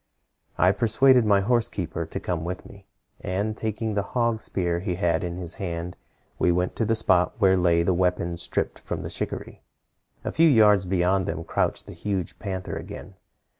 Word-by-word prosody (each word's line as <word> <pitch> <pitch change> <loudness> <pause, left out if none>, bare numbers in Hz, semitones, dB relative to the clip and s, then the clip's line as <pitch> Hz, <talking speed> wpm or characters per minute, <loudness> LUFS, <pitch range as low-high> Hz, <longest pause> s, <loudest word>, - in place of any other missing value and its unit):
"I 90 - +5
persuaded 120 +3 +4
my 100 -1 +4
horse 120 +2 +1
keeper 90 -8 -4
to - - -5
come 85 -3 -3
with 90 +2 -5
me, 100 -1 -15 0.3
and 100 +4 -2
taking 110 0 -3
the 100 - +1 0.2
hog 115 -2 +1
spear 90 -5 -1
he 90 -1 -2
had 85 -3 0
in 85 0 -4
his 90 -2 -4
hand, 85 -1 -4 0.4
we 90 - +3
went 90 +1 0
to 115 - +1
the 115 +2 +1
spot 95 -5 +2
where 95 -4 +4
lay 85 -2 +3
the 90 - +2
weapons 85 -1 0
stripped - - -2
from - - -5
the - - -5
shikaree. - - -5 0.6
A - - -3
few 165 0 +5
yards 105 -7 +5
beyond 95 +1 +1
them 85 - -3
crouched - - -1
the - - -9
huge 95 -4 -3
panther 95 -3 -4
again. 100 - -8
95 Hz, 185 wpm, -25 LUFS, 90-110 Hz, 0.6 s, I